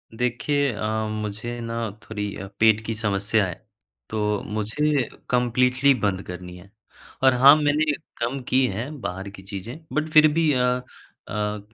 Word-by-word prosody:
देखिए 130 Hz, +4 st, 0 dB
अ, 110 Hz, +1 st, -2 dB
मुझे 110 Hz, +3 st, -4 dB
ना 115 Hz, 0 st, -4 dB, 0.3 s
थोड़ी 105 Hz, -2 st, -4 dB
अ, 100 Hz, -, -7 dB
पेट 110 Hz, -1 st, +5 dB
की 115 Hz, -, -2 dB
समस्या 105 Hz, 0 st, +1 dB
है, 90 Hz, -, -4 dB, 0.6 s
तो 105 Hz, -1 st, -1 dB
मुझे 120 Hz, +6 st, 0 dB, 0.2 s
कंप्लीटली 125 Hz, +2 st, +3 dB
बंद 100 Hz, -5 st, -1 dB
करनी 90 Hz, 0 st, -8 dB
है, 95 Hz, +2 st, -16 dB, 0.5 s
और 130 Hz, -, +6 dB
हाँ 135 Hz, +4 st, +8 dB
मैंने 150 Hz, 0 st, +2 dB, 0.3 s
कम 120 Hz, +4 st, -1 dB
की 130 Hz, +1 st, +4 dB
हैं 125 Hz, +9 st, -5 dB
बाहर 95 Hz, +1 st, -4 dB
की 100 Hz, -1 st, -12 dB
चीज़ें 100 Hz, +7 st, -7 dB, 0.2 s
बट 155 Hz, +1 st, 0 dB
फिर 155 Hz, 0 st, +8 dB
भी 160 Hz, -1 st, +3 dB
अ 125 Hz, -1 st, +2 dB, 0.6 s
अ, 105 Hz, 0 st, -2 dB
115 Hz, 155 wpm, -24 LUFS, 105-130 Hz, 0.6 s, हाँ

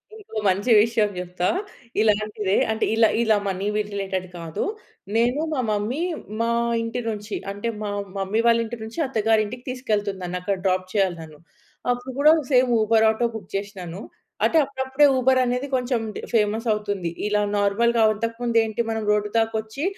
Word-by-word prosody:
ఇంకో 405 Hz, -, -10 dB
మంచి 200 Hz, +6 st, +1 dB
విషయం 225 Hz, -2 st, +2 dB
చెప్తా 180 Hz, 0 st, -2 dB, 0.5 s
ఇలాంటిదే 210 Hz, -2 st, +1 dB, 0.2 s
అంటే 220 Hz, -, 0 dB
ఇలా, 225 Hz, 0 st, +5 dB, 0.2 s
ఇలా 220 Hz, -2 st, +4 dB
మనీవి 200 Hz, +3 st, -1 dB
రిలేటెడ్ 195 Hz, -2 st, -3 dB
కాదు. 165 Hz, -1 st, -4 dB, 0.5 s
నేను, 240 Hz, +5 st, +2 dB
మా 285 Hz, -, -1 dB
మమ్మీ 210 Hz, +7 st, -1 dB, 0.4 s
మా 230 Hz, -, +1 dB, 0.3 s
ఇంటి 230 Hz, +2 st, -3 dB
నుంచి 210 Hz, -1 st, -4 dB, 0.2 s
అంటే 205 Hz, +4 st, -3 dB
మా 210 Hz, -, -2 dB, 0.3 s
మమ్మీ 195 Hz, +3 st, -1 dB
వాళ్ళ 230 Hz, 0 st, +5 dB
ఇంటి 240 Hz, +2 st, -6 dB
నుంచి 225 Hz, +7 st, -7 dB
అత్తగారి 225 Hz, -4 st, +2 dB
ఇంటికి 245 Hz, +4 st, -8 dB
తీసుకెళ్తుంది. 215 Hz, -6 st, -2 dB
నన్ను 180 Hz, 0 st, -3 dB
అక్కడ 195 Hz, +2 st, 0 dB
డ్రాప్ 185 Hz, -1 st, +1 dB
చేయాలి 190 Hz, -4 st, +1 dB
తను. 155 Hz, -2 st, -12 dB, 0.5 s
అప్పుడు 245 Hz, +1 st, -4 dB
కూడా 300 Hz, +2 st, +7 dB, 0.2 s
సేమ్ 250 Hz, -1 st, +4 dB
ఉబర్ 220 Hz, 0 st, +4 dB
ఆటో 220 Hz, +2 st, +1 dB
బుక్ 220 Hz, -, -8 dB
చేసినాను. 195 Hz, -3 st, -5 dB, 0.4 s
అంటే 330 Hz, -, +3 dB
అప్పుడప్పుడే 265 Hz, +1 st, +1 dB
ఉబర్ 260 Hz, +1 st, +4 dB
అనేది 250 Hz, +3 st, -1 dB
కొంచెం 250 Hz, -2 st, 0 dB, 0.3 s
ఫేమస్ 220 Hz, +1 st, +1 dB
అవుతుంది. 205 Hz, -4 st, -3 dB, 0.2 s
ఇలా 210 Hz, 0 st, +1 dB, 0.2 s
నార్మల్‌గా 230 Hz, +4 st, +2 dB
అంతకు 230 Hz, +2 st, -3 dB
ముందు 235 Hz, -1 st, +1 dB
ఏంటి 220 Hz, +1 st, -2 dB
మనం 225 Hz, -1 st, -2 dB
రోడ్డు 210 Hz, 0 st, +1 dB
దాకా 225 Hz, 0 st, +1 dB
వచ్చి 220 Hz, +6 st, -7 dB
220 Hz, 160 wpm, -23 LUFS, 200-235 Hz, 0.5 s, కూడా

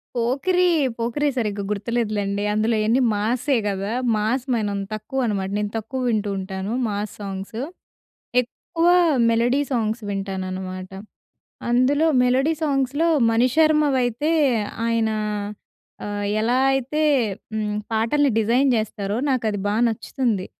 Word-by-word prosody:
'పోకిరీ', 325 Hz, +8 st, +2 dB, 0.2 s
'పోకిరి' 240 Hz, +6 st, 0 dB
సరిగ్గా 210 Hz, -4 st, -1 dB
గుర్తులేదులలేండి 210 Hz, -2 st, -1 dB
అందులో 220 Hz, +2 st, +1 dB
యన్నీ 225 Hz, +5 st, +2 dB
మాసే 245 Hz, +6 st, 0 dB
గదా! 200 Hz, +1 st, -2 dB, 0.2 s
మాస్ 220 Hz, +5 st, 0 dB
మనం 205 Hz, -3 st, -1 dB
తక్కువ 215 Hz, +5 st, -3 dB
అనమాట 195 Hz, -4 st, -1 dB
నేను 210 Hz, 0 st, -2 dB
తక్కువ 225 Hz, +4 st, -5 dB
వింటూ 215 Hz, -2 st, 0 dB
ఉంటాను 190 Hz, +2 st, -4 dB, 0.2 s
మాస్ 205 Hz, 0 st, -3 dB
సాంగ్స్. 195 Hz, +3 st, -5 dB, 0.8 s
ఎక్కువ 330 Hz, +7 st, -3 dB, 0.4 s
మెలోడీ 235 Hz, +4 st, +2 dB
సాంగ్స్ 225 Hz, -2 st, -1 dB
వింటాననమాట. 185 Hz, -1 st, -4 dB, 0.8 s
అందులో 265 Hz, +6 st, +3 dB, 0.2 s
మెలోడీ 260 Hz, +5 st, +2 dB
సాంగ్స్‌లో 285 Hz, +2 st, +1 dB, 0.2 s
మణిశర్మవైతే 270 Hz, +1 st, +2 dB, 0.5 s
ఆయన 230 Hz, -1 st, +1 dB, 1.0 s
ఆహ్, 205 Hz, 0 st, -3 dB
ఎలా 240 Hz, +3 st, +2 dB
అయితే 270 Hz, +4 st, -1 dB, 0.5 s
హ్మ్, 210 Hz, -1 st, -1 dB, 0.2 s
పాటల్ని 250 Hz, +6 st, +2 dB
డిజైన్ 245 Hz, +5 st, +3 dB
జేస్తారో 210 Hz, -2 st, -2 dB
నాకది 220 Hz, -6 st, 0 dB
బా 205 Hz, -, 0 dB
నచ్చుతుంది. 225 Hz, -3 st, -2 dB
225 Hz, 110 wpm, -22 LUFS, 205-260 Hz, 1.0 s, అందులో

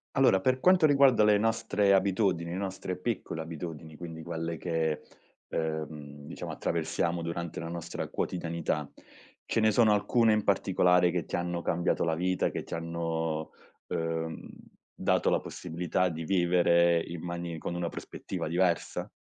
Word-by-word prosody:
Allora, 130 Hz, -8 st, +5 dB
per 130 Hz, +4 st, +2 dB
quanto 180 Hz, 0 st, +5 dB
riguarda 140 Hz, -6 st, +5 dB
le 105 Hz, -1 st, +5 dB
nostre 105 Hz, -2 st, +2 dB
abitudini, 95 Hz, -3 st, +2 dB
le 90 Hz, -, -3 dB
nostre 95 Hz, -2 st, -4 dB
piccole 90 Hz, -5 st, -3 dB
abitudini, 80 Hz, -1 st, -7 dB
quindi 80 Hz, 0 st, -8 dB
quelle 80 Hz, 0 st, -4 dB
che, 80 Hz, -2 st, -1 dB, 0.5 s
uhm, 75 Hz, -2 st, -4 dB
diciamo, -, -, -6 dB
attraversiamo 85 Hz, 0 st, -1 dB
durante 85 Hz, 0 st, -4 dB
la 85 Hz, -, -5 dB
nostra 85 Hz, 0 st, -5 dB
quotidianità, 80 Hz, -4 st, -2 dB, 0.5 s
ce -, -, 0 dB
ne 110 Hz, 0 st, +4 dB
sono 110 Hz, 0 st, +5 dB
alcune 110 Hz, +2 st, +3 dB
in 105 Hz, -1 st, +1 dB
particolare 90 Hz, -2 st, +3 dB
che 90 Hz, -1 st, -2 dB
ti -, -, -4 dB
hanno 85 Hz, 0 st, -2 dB
cambiato 85 Hz, +1 st, 0 dB
la 80 Hz, -1 st, +1 dB
vita 90 Hz, +2 st, +1 dB
che -, -, -4 dB
ti -, -, -9 dB
hanno, 80 Hz, -1 st, -2 dB, 0.4 s
uhm, 80 Hz, 0 st, -3 dB, 0.5 s
dato -, -, +2 dB
la -, -, +3 dB
possibilità 90 Hz, +2 st, -2 dB
di 80 Hz, -1 st, -5 dB
vivere 85 Hz, -1 st, +4 dB
in 85 Hz, -1 st, -6 dB
mani 85 Hz, -1 st, -4 dB
con 85 Hz, -, -4 dB
una 85 Hz, -1 st, -2 dB
prospettiva -, -, -6 dB
diversa? 85 Hz, +1 st, 0 dB
85 Hz, 150 wpm, -29 LUFS, 80-95 Hz, 0.5 s, Allora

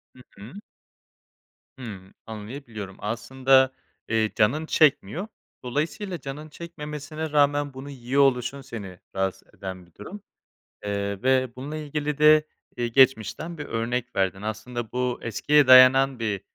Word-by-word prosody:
Hı -, -, -17 dB, 0.2 s
hı. 105 Hz, -, -11 dB, 1.3 s
Hımm, 100 Hz, -6 st, -9 dB
anlayabiliyorum. 110 Hz, -2 st, -8 dB
Aslında, 130 Hz, +4 st, +2 dB, 0.4 s
eee, 110 Hz, -1 st, +1 dB
canın 125 Hz, +9 st, +2 dB
çekmiyor. 155 Hz, -, +2 dB, 0.4 s
Dolayısıyla 165 Hz, -, -3 dB
canın 150 Hz, +3 st, -8 dB
çekmemesine 155 Hz, -1 st, -7 dB
rağmen 145 Hz, -1 st, +2 dB
bunu 135 Hz, +2 st, -9 dB
yiyor 135 Hz, +1 st, 0 dB
oluşun 130 Hz, 0 st, +1 dB
seni 105 Hz, -9 st, -9 dB, 0.2 s
rahatsız 95 Hz, 0 st, -2 dB
eden 95 Hz, -2 st, -7 dB
bir 85 Hz, -, -27 dB
durum. 190 Hz, -, -9 dB, 0.6 s
Eee, 100 Hz, 0 st, -3 dB
ve 130 Hz, 0 st, +3 dB
bununla 145 Hz, +4 st, -6 dB
ilgili 150 Hz, -1 st, -3 dB
de, 150 Hz, 0 st, +6 dB, 0.3 s
eee, 120 Hz, -1 st, -1 dB
geçmişten 135 Hz, +6 st, +2 dB
bir 150 Hz, -, -5 dB
örnek 120 Hz, +2 st, -3 dB
verdin. 95 Hz, 0 st, 0 dB
Aslında 110 Hz, +2 st, -5 dB
bu, 125 Hz, 0 st, -1 dB
eskiye 145 Hz, +6 st, +3 dB
dayanan 130 Hz, +1 st, +7 dB
bir 105 Hz, -4 st, -2 dB
130 Hz, 125 wpm, -25 LUFS, 110-145 Hz, 1.3 s, dayanan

